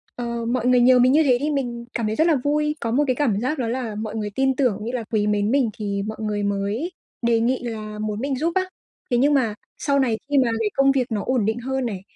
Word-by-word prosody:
ờ, 235 -1 -3
mọi 240 0 -1
người 250 -1 +5
nhờ 250 +1 +6
mình 250 +1 +5
như 310 +3 +5
thế 255 -4 +4
thì 300 +1 0
mình 240 -4 -3
cảm 230 - -1
thấy 215 - -1
rất 320 +6 +3
là 325 - +4
vui, 300 +1 +1
có 230 - -2
một 275 +5 +3
cái 255 - +1
cảm 235 -8 +1
giác 295 +6 -1
đó 240 - -1
là 235 -2 -3
mọi 215 0 -5
người 210 -2 -2
tin 265 0 +2
tưởng 250 -6 +2
cũng 210 - -7
như 235 - -3
là 250 -2 -3
quý 210 -2 +1
mến 210 0 +1
mình 265 -4 +2
thì 200 -2 -2
mọi 220 - -5
người 210 -1 -2
mới 200 - -1 0.3
đề 235 -1 +2
nghị 250 +3 +1
là 215 -3 -5
muốn 215 -1 -3
mình 275 +2 -1
giúp 325 +5 0
á. 375 0 +2 0.5
Thế 245 - +3
nhưng 285 +4 +3
mà 245 -6 +2 0.2
sau 280 -1 +1
này 240 -5 +1
khi 290 - +2
mà 255 -3 +3
cái 220 -2 +1
công 275 0 +4
việc 255 -3 0
nó 210 -2 -1
ổn 255 -5 +1
định 220 +3 0
hơn 265 +1 -2
này, 200 -6 -4
240 Hz, 280 wpm, -23 LUFS, 220-270 Hz, 0.5 s, nhờ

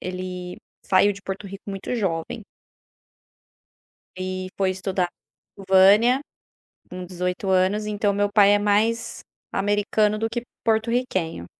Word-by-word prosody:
ele 180 0 -6 0.3
saiu 200 +2 +3
de 200 - -12
Porto 195 +1 -6
Rico 195 +1 -10
muito 195 +4 -4
jovem. 210 +2 -2 1.8
E 185 0 -4
foi 190 -1 +1
estudar 185 -1 -1 0.6
vânia 205 +7 +6 0.7
com 180 0 -7
18 180 +2 -3
anos, 190 +3 +2
então 205 -1 0
o - - -4
meu 205 0 +1
pai 205 -1 +6
é 205 - +3
mais 215 +3 +1 0.3
americano 205 +1 +1
do 225 +1 -1
que 235 +1 -4 0.2
porto-riquenho. 220 - 0
200 Hz, 125 wpm, -23 LUFS, 185-210 Hz, 1.8 s, vânia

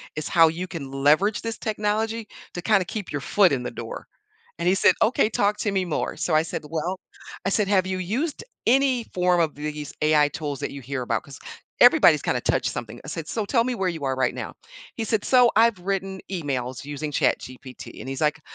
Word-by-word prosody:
is 155 -1 -4
how 165 -2 +6
you 175 +3 -4
can 155 -7 -7
leverage 150 +10 +2
this 230 0 -4
technology 220 +1 -2 0.3
to 175 - -5
kinda 195 -1 +3
keep 210 0 -6
your 145 - -3
foot 195 +4 +4
in 125 -2 -1
the - - -4
door," - - -7 0.5
and - - -1
he 185 - +4
said, - - +5
"Okay, 220 -1 +3
talk 210 -1 +1
to 205 - 0
me 190 -2 0
more," 170 - -2
so 160 - 0
I 155 - +4
said, 165 - -5
"Well," 170 +4 -3 0.5
I - - +2
said, 205 0 +1
"Have 190 -2 +3
you 190 0 -2
used 255 - -2 0.2
any 260 -1 +3
form 180 -1 +2
of 160 -2 0
th 150 +1 -4
these 150 -1 -7
AI 150 -1 +4
tools 145 -2 -5
that - - -3
you 140 - -8
hear 130 +1 -4
about?, - - -1
'cause 140 - -12 0.4
everybody's - - +7
kind - - 0
of - - -5
touched - - +1
something". - - -7
I - - -9
said, 165 -2 -5
"So 220 -3 -2
tell 230 +2 +2
me 255 -1 -1
where 190 -4 0
you 160 -5 -4
are 135 -1 0
right 130 -1 +1
now." - - -6 0.4
He 225 - -3
said, 215 -1 0
"So, 250 -2 +5
I've 230 -2 +5
written 190 0 -3
emails 135 -7 -3
using 145 +1 -5
ChatGPT," 130 -2 -3
and - - -8
he's 135 0 -5
like, 150 0 +1
180 Hz, 225 wpm, -24 LUFS, 150-210 Hz, 0.5 s, everybody's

